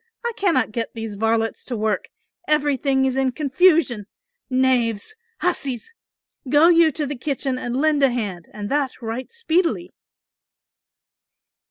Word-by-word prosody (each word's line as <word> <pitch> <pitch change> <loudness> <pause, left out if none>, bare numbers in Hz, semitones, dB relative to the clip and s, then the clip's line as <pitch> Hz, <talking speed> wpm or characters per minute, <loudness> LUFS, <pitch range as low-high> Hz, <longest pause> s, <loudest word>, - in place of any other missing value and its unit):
I 475 - 0
cannot 330 - +1
get 230 +2 -4
those 225 -2 -5
varlets 225 +1 0
to 245 - -4
work, 215 0 -1 0.4
everything 280 -3 +2
is 260 0 0
in 265 -1 +1
confusion, 285 - +2 0.4
knaves! 255 - +1 0.3
hussies! 340 - -2 0.6
go 300 +5 +6
you 335 -2 +5
to 300 +1 -1
the 290 +1 -4
kitchen 270 -1 -2
and 245 0 -3
lend 305 -1 +2
a 275 - +5
hand 205 -8 -4
and 205 -1 -6
that 280 -2 -1
right 230 +3 -4
speedily." 355 -6 0
265 Hz, 135 wpm, -22 LUFS, 230-305 Hz, 0.6 s, go